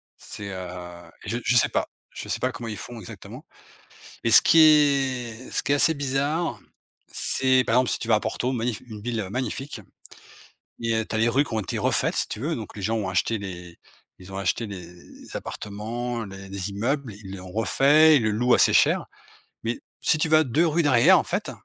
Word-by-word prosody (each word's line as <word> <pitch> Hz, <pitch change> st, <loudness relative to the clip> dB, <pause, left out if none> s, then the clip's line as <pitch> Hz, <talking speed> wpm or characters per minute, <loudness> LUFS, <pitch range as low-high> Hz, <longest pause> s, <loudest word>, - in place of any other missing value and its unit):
C'est, 100 Hz, -1 st, -8 dB
heu, 90 Hz, -2 st, -8 dB
je 120 Hz, -, -2 dB
je 125 Hz, -, +2 dB
sais -, -, +5 dB
pas. -, -, -1 dB, 0.2 s
Je -, -, -8 dB
sais -, -, -1 dB
pas 130 Hz, +1 st, 0 dB
comment 115 Hz, -2 st, -7 dB
ils 105 Hz, -, -5 dB
font 120 Hz, -2 st, -8 dB
exactement. 95 Hz, -, -11 dB, 0.8 s
Et 115 Hz, -, +2 dB
ce -, -, +9 dB
qui 165 Hz, -, +4 dB
est 135 Hz, -6 st, +3 dB
ce -, -, -1 dB
qui 130 Hz, -, 0 dB
est -, -, +5 dB
assez 160 Hz, +3 st, +3 dB
bizarre, 145 Hz, +4 st, -1 dB, 0.5 s
c'est, 130 Hz, -1 st, +2 dB
par 115 Hz, -, +1 dB
exemple, 125 Hz, 0 st, +3 dB
si -, -, -1 dB
tu 115 Hz, -, -6 dB
vas 115 Hz, -, +5 dB
à 105 Hz, -, +2 dB
Porto, 125 Hz, +2 st, -2 dB
magnif 120 Hz, -2 st, -2 dB
une 105 Hz, -3 st, -9 dB
ville 115 Hz, -5 st, -3 dB
magnifique, 130 Hz, 0 st, -4 dB, 1.0 s
et 115 Hz, -1 st, 0 dB
tu -, -, -6 dB
as -, -, 0 dB
les 115 Hz, +1 st, +3 dB
rues 140 Hz, +5 st, +2 dB
qui 115 Hz, -, -7 dB
ont 110 Hz, -, +1 dB
été 95 Hz, -, -4 dB
refaites, -, -, +1 dB
si -, -, -1 dB
tu -, -, -5 dB
veux, 160 Hz, +4 st, -1 dB
donc 110 Hz, -2 st, -8 dB
les 100 Hz, -, -7 dB
gens 110 Hz, +3 st, 0 dB
ont 100 Hz, -, -3 dB
acheté 95 Hz, +4 st, 0 dB
les 90 Hz, -3 st, -8 dB, 0.4 s
ils 95 Hz, +1 st, -13 dB
ont 95 Hz, -, -7 dB
acheté 100 Hz, +4 st, -1 dB
les 95 Hz, -4 st, -8 dB
les 90 Hz, -, -15 dB
appartements, 115 Hz, +3 st, -5 dB
les 95 Hz, 0 st, -10 dB
les 100 Hz, 0 st, -4 dB
immeubles, 120 Hz, +3 st, -2 dB
ils 100 Hz, -1 st, -9 dB
l'ont 90 Hz, -1 st, -10 dB
refait, 145 Hz, +9 st, +5 dB
ils 125 Hz, -, +2 dB
le 110 Hz, -, +1 dB
louent 120 Hz, +4 st, +1 dB
assez -, -, +4 dB
cher. -, -, +3 dB, 0.6 s
Mais 115 Hz, +1 st, -2 dB, 0.2 s
si 155 Hz, -, +2 dB
tu 160 Hz, -, +1 dB
vas 155 Hz, 0 st, +5 dB
2 155 Hz, +6 st, +2 dB
rues 165 Hz, +2 st, +1 dB
derrière, 130 Hz, -5 st, +6 dB
en -, -, +1 dB
fait, -, -, -3 dB
115 Hz, 215 wpm, -24 LUFS, 100-135 Hz, 1.0 s, ce